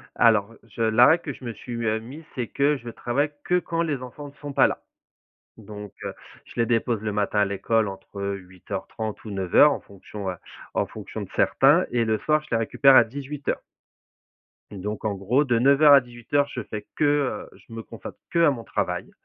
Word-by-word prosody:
Alors, 115 -1 +3
je 115 - -5
la 110 +2 +6
règle 170 +2 +4
que 145 - -4
je 130 - -13
me 120 - -4
suis, 120 - -10
heu, 110 0 +1
mise, 140 +8 -10
c'est 125 -3 -2
que 145 +5 +2
je 120 -1 -10
travaille 140 +6 -1
que 180 0 +2
quand 170 -1 -2
les 145 -6 -2
enfants 145 +3 -8
ne 140 - -16
sont 145 -1 -6
pas 135 - +5
là. - - -3 0.8
Donc, 105 -2 -10
heu, - - -3 0.3
je - - -14
les 115 - +3
dépose 115 -1 +1
le 105 -1 -2
matin 105 0 0
à - - +5
l'école 100 +2 0
entre 95 +1 -9
8:30 100 +2 -5
ou 110 - -7
9:00, 95 +10 +4
en - - -3
fonction, 100 0 -8
heu, 90 - -6 0.4
en - - +1
fonction - - -8
de - - -8
certains. - - +4
Et 120 -1 +1
le 110 -1 +1
soir, 150 +6 +1
je 155 - -17
les 115 - +2
récupère 135 +4 +5
à - - +8
18:00. 140 +3 -4 1.1
Donc 105 +2 -5
en 105 - 0
gros, 110 +9 +1
de 120 -4 +2
9:00 140 +3 +6
à 140 - +8
18:00, 125 +4 -1
je 125 - -3
fais 105 0 -7
que, 155 - +1 0.5
heu, - - -17
je - - -19
me 115 0 -6
consacre - - -10
qu'à 170 -3 +4
mon 120 -5 -5
travail - - -2
115 Hz, 210 wpm, -25 LUFS, 105-140 Hz, 1.1 s, à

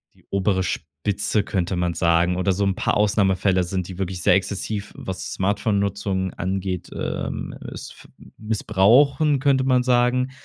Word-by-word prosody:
die - - -25
obere 100 -1 +1
Spitze, 95 +7 -2
könnte 95 -2 -2
man 90 -1 0
sagen 85 +1 +2
oder 95 +1 +1
so 100 +2 -1
'n 95 -1 0
paar - - 0
Ausnahmefällen 95 -3 +2
sind, 90 0 -3
die 95 - -8
wirklich 95 -1 -3
sehr 90 - +5
exzessiv, 100 +2 -3
was 95 0 -5
Smartphonenutzung 100 -1 -1
angeht, 95 0 -3
ähm, - - -4 0.2
s - - -8
f - - -16 0.3
missbrauchen, 125 - +3
könnte 135 -1 +2
man 125 -1 +3
sagen, 125 +1 +2
100 Hz, 150 wpm, -22 LUFS, 90-110 Hz, 0.3 s, sehr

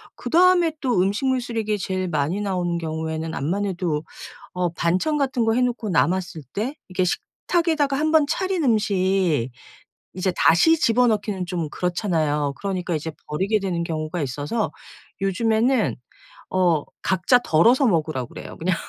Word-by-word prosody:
그다음에 350 0 +3
또 250 -8 +1
음식물 230 +8 +1
쓰레기 225 -3 -2
제일 185 -1 -2
많이 160 +4 -1
나오는 180 -4 -1
경우에는 160 0 -4
암만해도 175 -1 -1 0.5
어 180 -1 0
반찬 185 - 0
같은 260 -4 0
거 225 - +2
해 250 - +2
놓고 245 -4 -1
남았을 175 -1 0
때 235 +8 -2 0.2
이게 185 0 0
식탁에다가 305 - 0
1 310 +1 +1
번 315 -2 +5
차린 370 +2 -1
음식 190 - +1 0.6
이제 185 0 -1
다시 175 - +5
집어넣기는 215 - +1
좀 175 -3 -3
그렇잖아요. 160 -6 -1
그러니까 185 -4 -2
이제 160 +1 -4 0.2
버리게 195 +8 0
되는 180 -3 -2
경우가 160 0 -3
있어서 145 - -2 0.5
요즘에는 220 +6 +1 0.5
어 175 -5 +2 0.2
각자 190 +7 +3
덜어서 240 - +4
먹으라고 155 - 0
그래요 - - -9
그냥. 180 +2 0
190 Hz, 325 characters per minute, -23 LUFS, 165-235 Hz, 0.6 s, 번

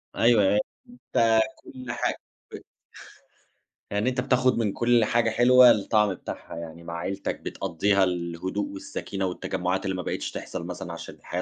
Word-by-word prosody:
أيوه 115 -3 +4
أي 105 +2 +3 0.3
أنت 115 - +2 0.2
كل 130 -2 -8
حاجة - - -1 0.4
ب - - -6 1.3
يعني 105 +5 +1
أنت 125 0 -1
بتاخُد 130 0 +2
من 110 -4 0
كل 120 -2 +3
حاجة 120 0 +2
حلوة 125 +2 +7
الطعم 105 -1 +2
بتاعها. 90 - -8
يعني 85 0 -8
مع 85 - -7
عيلتك 95 +3 -3
بتقضّيها 95 +2 0
الهدوء 90 - -2
والسكينة 285 - -4
والتجمُّعات 90 0 -2
اللي 95 -1 -1
ما 90 - -4
بقيتش - - -3
تحصل - - -6
مثلًا - - -6
عشان - - -9
الحياة 90 - -5
105 Hz, 150 wpm, -26 LUFS, 95-120 Hz, 1.3 s, حلوة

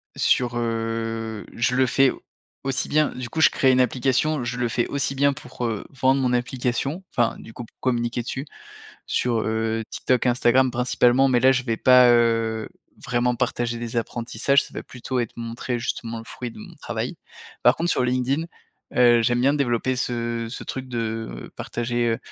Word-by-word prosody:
sur, 120 -1 +2
heu, 115 -1 -3
je 120 +2 0
le 130 0 +4
fais 135 +1 +3 0.5
aussi 135 -1 -1
bien 155 0 +3
du 125 -1 -6
coup 160 - -2
je - - +8
crée 130 -1 +3
une 130 - +3
application 130 +3 +1
je 125 +1 -3
le 120 -1 0
fais 120 +1 0
aussi 140 -1 -1
bien 140 +1 +2
pour, 125 -3 -6
heu, 110 -3 -3
vendre 135 0 +2
mon 125 -1 +1
application. 125 +6 -1
Enfin 120 -1 +1
du 115 - -12
coup 120 - -7
p - - -24
communiquer 120 -1 -1
dessus 135 +3 -4 0.6
sur, 120 -2 0
heu, 110 0 -1
TikTok, 130 -1 0
Instagram 125 +1 +3
principalement 125 +1 +3
mais 125 -2 +3
là 130 +2 +6
je 130 -1 0
vais 115 -3 -1
pas, 125 0 +6
heu, 115 -2 +2 0.4
vraiment 125 0 +1
partager 120 -1 -1
des 120 0 -5
apprentissages. 120 +4 +1
Ça - - -13
va - - -6
plutôt 130 +1 -4
être 115 -2 -3
montrer 120 +1 -4
justement 115 0 -4
le 115 - -11
fruit 125 0 -6
de - - -14
mon - - -11
travail. - - -4 0.5
Par 125 - +6
contre 170 +1 0
sur - - +1
LinkedIn, 130 +5 0 0.5
heu, 120 -1 +6
j'aime 120 +1 +1
bien 140 +3 +4
développer 130 -2 0
ce 120 -2 -2
ce - - -7
truc 130 -1 -5
de 115 - -4
partager, 120 0 -2
heu, 115 - 0
120 Hz, 185 wpm, -23 LUFS, 115-130 Hz, 0.6 s, je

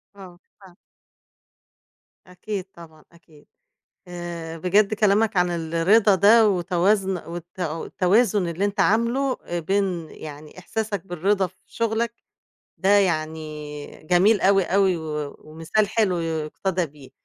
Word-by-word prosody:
آه، 185 -3 -12 0.2
فعلًا. 185 -3 -16 1.5
أكيد 185 +1 -6
طبعًا، 160 -2 -15
أكيد. 165 -3 -21 0.6
آآ، 170 -2 -6
بجد 200 +5 +2
كلامك 210 +1 +2
عن 180 0 +3
الرضا 170 +6 +3
ده 215 +4 +6
وتوازن 190 +1 +1
والت 175 +2 -9
والتوازن 180 +5 +1
اللي 170 +4 -2
أنت 205 0 -1
عامله 235 +6 +2
آآ، 175 0 -3
بين 180 -2 -1
يعني 150 +2 -11
إحساسك 205 0 -4
بالرضا 190 +2 0
في 185 +1 -19
شغلك، 230 0 -2 0.6
ده 190 - 0
يعني 155 -6 0 0.2
جميل 185 +6 +4
أوي، 195 0 +4
أوي، 190 0 +2
و 150 -3 -5
ومثال 165 +7 -2
حلو 205 -4 +1
يُقتَدَى 165 +3 -2
بيه. 145 -2 -16
180 Hz, 120 wpm, -23 LUFS, 165-205 Hz, 1.5 s, ده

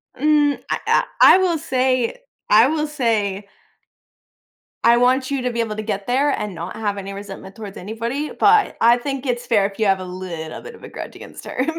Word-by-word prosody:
Mm, 295 +1 +2
I - - -1
I - - +4 0.2
I - - +9
will 360 -3 +1
say 255 - 0 0.3
I 220 +4 +6
will 305 +1 -1
say 215 -8 -1 1.4
I 235 +1 +6
want 260 +2 +2
you 275 -2 -1
to 250 0 -1
be 235 - -4
able 225 -2 -1
to 215 - -4
get 200 -2 -4
there, 270 +4 +2
and 210 -6 -3
not 170 +2 -6
have 205 -2 -2
any 195 0 -6
resentment 195 -1 -9
towards 210 -3 -9
anybody, 230 +9 -4
but 420 0 +3
I 235 +1 +5
think 270 +2 -4
it's 245 -2 -2
fair 210 -4 +2
if 200 +1 -5
you 220 - +2
have 195 -1 +2
a - - -6
little 180 -3 -7
bit 470 - -10
of - - -18
a - - -9
grudge - - -8
against - - -11
her 255 - -2
235 Hz, 210 wpm, -20 LUFS, 200-275 Hz, 1.4 s, I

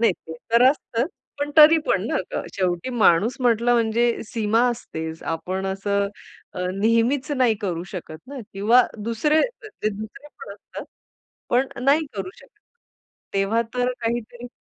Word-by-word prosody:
नाही. 230 -5 +4
ते 160 - -7 0.2
तर 235 +1 +6
असतं, 250 -3 -2 0.3
पण 290 0 -2
तरी 315 +1 +9
पण - - +1
ना, - - -2
आता - - -2
शेवटी 180 +4 -1
माणूस 215 -1 +3
म्हटलं 240 0 +3
म्हणजे 235 +1 +2
सीमा 225 0 +1
असतेच. 160 -9 -6
आपण 185 +4 -3
असं 200 +1 -1 0.5
अ, 180 0 -2
नेहमीच 230 +7 +1
नाही 250 -5 +3
करू 175 -4 -2
शकत 160 -4 -7
ना 280 0 -8
किंवा 220 +6 +5 0.2
दुसरे, 300 +8 +2 0.5
दुसरे 215 +7 -8
पण 460 - -8
असतात, - - -10 0.7
पण 255 +3 +3 0.2
नाही 295 +3 +3
करू 190 -1 -4
शकत. 275 +10 -20 0.8
तेव्हा 195 +4 +2
तर 250 0 +1
काहीतरी 240 +1 -3
230 Hz, 145 wpm, -23 LUFS, 195-250 Hz, 0.8 s, तरी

